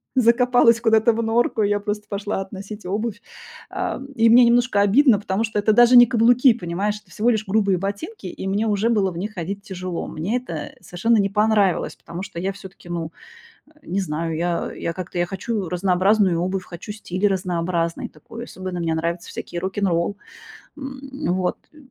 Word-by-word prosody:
закопалась 240 -1 +4
куда-то 225 0 +4
в 230 - -1
норку. 230 +1 +1
И 205 - +2
я 205 0 +1
просто 210 +1 -4
пошла 200 -1 -3
относить 195 +1 -8
обувь. 215 +3 -3 0.5
Ам, 265 - -4
и 230 -1 +4
мне 240 +2 +7
немножко 240 -3 +3
обидно, 220 +2 +5
потому 200 +1 -1
что 220 -2 -1
это 215 +1 +3
даже 240 +2 +6
не 240 0 +9
каблуки, 245 +2 +4
понимаешь, 195 +1 -2
это - - -25
всего 225 +3 +1
лишь 220 -2 0
грубые 200 -2 +2
ботинки, 200 - -5
и 185 +1 -6
мне 200 +3 0
уже 210 +2 +1
было 205 -5 +2
в 170 - -8
них 210 +4 -5
ходить 195 +3 -4
тяжело. 185 -3 -5
Мне 185 +10 -2
это 170 -12 -6
совершенно 225 +6 +1
не 200 -1 +2
понравилось, 210 -2 +2
потому 170 +2 -8
что 170 - -7
я 190 +3 -1
всё-таки, 190 -2 -13
ну, 165 -2 -4 0.6
э, 310 0 -25
не 190 +3 -1
знаю, 165 -2 -3
я 170 +1 -2
я 170 - -4
как-то, 180 0 -6
я 175 - +1
хочу 195 +1 -3
разнообразную 185 +1 +2
обувь, 185 +1 -2
хочу 175 +3 -10
стиль 205 -2 -1
разнообразный 175 -3 -2
такой, 225 +10 -10
особенно 185 -5 -6
мне 165 -1 0
нравятся 170 +2 -3
всякие 175 - -6
рок-н-ролл. 190 0 -1 0.6
М, 270 +1 -7
вот. 185 -1 -1 0.2
Э, - - -19
200 Hz, 185 wpm, -22 LUFS, 180-225 Hz, 0.6 s, не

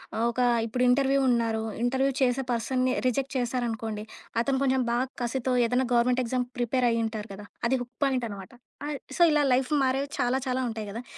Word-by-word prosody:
ఆహ్, 225 - +1
ఒక 245 - -6 0.3
ఇప్పుడు 250 +3 -1
ఇంటర్వ్యూ 275 +2 +3
ఉన్నారు. 230 -2 +1 0.2
ఇంటర్వ్యూ 265 +2 +2
చేసే 255 +1 +2
పర్సన్‌ని 255 +2 0
రిజెక్ట్ 265 +2 -1
చేశారనుకోండి, 230 -3 -2 0.4
అతను 265 +2 0
కొంచెం 265 -1 +2
బాగా 245 +2 +1
కసితో 250 +1 -1
ఏదైనా 250 +3 +1
గవర్నమెంట్ 245 +1 +3
ఎగ్జామ్ 250 +1 -1
ప్రిపేర్ 245 +1 +1
అయ్యి 230 0 +1
ఉంటారు 220 -1 -5
కదా! 205 +1 -9 0.2
అది 260 +2 +2
హుక్ 245 0 -18
పాయింట్ 260 -3 +1
అనమాట. 195 -2 -8 0.4
ఆ! - - -3 0.3
సో, - - -1
ఇలా 300 -1 +3
లైఫ్ 255 +2 +1
మారేవి 270 +2 0
చాలా 250 +2 +2
చాలా 255 0 0
ఉంటాయి 220 -1 -5
కదా! 230 +4 -6
250 Hz, 185 wpm, -27 LUFS, 230-260 Hz, 0.4 s, ఇంటర్వ్యూ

